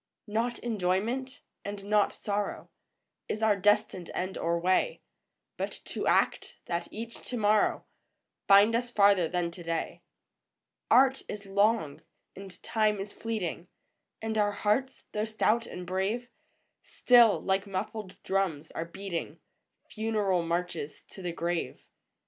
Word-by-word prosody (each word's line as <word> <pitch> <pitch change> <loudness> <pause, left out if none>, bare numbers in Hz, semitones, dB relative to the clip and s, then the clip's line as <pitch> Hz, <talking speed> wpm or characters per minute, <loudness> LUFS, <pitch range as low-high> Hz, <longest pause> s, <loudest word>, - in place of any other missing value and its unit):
VOICES - - -16
OF - - -11
THE - - -9
NIGHT. 220 - +2
Not 240 0 -4
enjoyment, 230 +5 -1 0.2
and 200 -1 -6
not 210 0 +3
sorrow, 205 0 -3 0.6
Is 220 - -2
our 215 -2 +5
destined 205 -2 +1
end 185 +1 -2
or 170 0 0
way; 185 - +1 0.5
But - - -4
to - - -4
act, - - +1
that 170 0 -2
each 230 +2 -7
to 250 - -2
morrow 210 -1 +2 0.6
Find 200 +3 +7
us 245 +1 -1
farther 200 -6 +4
than 175 0 -1
to 175 - -10
day. 165 -1 -3 0.9
Art 265 +1 +5
is 205 -1 -6
long, 200 -5 +1 0.3
and 190 -2 -11
Time 215 -2 +1
is 200 +1 -6
fleeting, 190 -6 -4 0.6
And 220 -1 -1
our 205 0 +2
hearts, 215 +6 0
though 210 0 -1
stout 220 +1 +1
and 180 - -7
brave, 195 +7 -1 0.5
Still, 240 -4 +5
like 195 +1 0
muffled 195 +1 -4
drums, 180 -6 -1
are 165 - -4
beating 175 0 -5 0.5
Funeral 210 -5 0
marches 170 -2 -3
to 190 - -11
the 175 -1 -3
grave. 170 0 -3
200 Hz, 145 wpm, -29 LUFS, 180-220 Hz, 0.9 s, Find